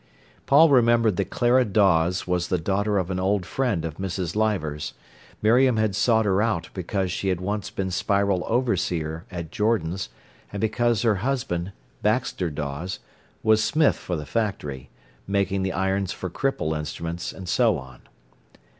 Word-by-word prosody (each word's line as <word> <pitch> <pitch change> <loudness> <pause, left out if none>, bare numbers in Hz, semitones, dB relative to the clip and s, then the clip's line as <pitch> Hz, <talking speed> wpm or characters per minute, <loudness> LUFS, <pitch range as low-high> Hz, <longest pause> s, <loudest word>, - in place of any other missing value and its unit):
Paul 155 +4 +7
remembered 115 -5 +4
that - - -1
Clara 125 +1 +3
Dawes 90 -5 +2
was 90 -1 0
the 90 - +1
daughter 100 +4 0
of 95 -1 -1
an 95 - -2
old 95 0 +1
friend 115 -11 -1
of 80 -1 -5
Mrs. 95 -2 -3
Leivers. 95 -9 -1 0.5
Miriam 120 +2 +4
had 110 -3 +1
sought 110 +1 +3
her 100 0 +2
out 105 -6 -1
because 95 0 -2
she 95 - -3
had 90 -2 +1
once 100 +2 -3
been 95 -1 -3
Spiral 100 0 +1
overseer 90 -9 -1
at 85 -4 -6
Jordan's, 95 -5 0 0.4
and 100 - -5
because 115 +1 +1
her 110 -4 +3
husband, 100 -6 -2 0.3
Baxter 90 - 0
Dawes, 75 +4 -4 0.5
was 110 0 +4
smith 155 +5 +3
for 90 - -4
the 75 -2 -5
factory, 75 - -3 0.4
making 100 -1 0
the 95 0 -1
irons 95 +1 0
for 95 - -5
cripple 85 - -1
instruments, 85 +3 -4
and 95 -1 -9
so - - +3
on. 65 -1 -11
95 Hz, 155 wpm, -24 LUFS, 85-110 Hz, 0.5 s, Paul